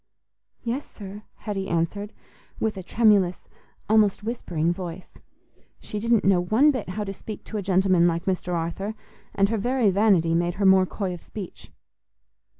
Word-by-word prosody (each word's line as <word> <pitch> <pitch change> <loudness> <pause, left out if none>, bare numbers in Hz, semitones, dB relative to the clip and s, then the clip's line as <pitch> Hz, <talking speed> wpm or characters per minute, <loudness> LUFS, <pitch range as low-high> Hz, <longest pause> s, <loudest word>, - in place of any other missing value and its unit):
"Yes, 250 +4 -2
sir," 200 0 -9
Hetty 195 -3 -4
answered, 185 +5 -1 0.5
with 220 -1 0
a 190 - -5
tremulous, 200 -3 +2 0.4
almost 210 -2 +3
whispering 175 -8 -1
voice. 180 0 -7 0.7
She 210 - -5
didn't 230 0 +2
know 190 -2 +4
one 230 +12 +4
bit 255 -9 -4
how 210 +3 -3
to 195 -1 -5
speak 210 +1 -8
to 220 - -6
a - - -1
gentleman 185 -2 +3
like 170 0 -1
Mr. 180 -2 -1
Arthur, 170 +6 -3 0.4
and 200 0 +3
her 225 -1 0
very 245 -1 +2
vanity 190 -5 +3
made 175 +1 +1
her 200 - 0
more 190 -1 +6
coy 190 -1 -3
of 175 - -9
speech. 200 -5 -9
195 Hz, 160 wpm, -25 LUFS, 180-215 Hz, 0.7 s, more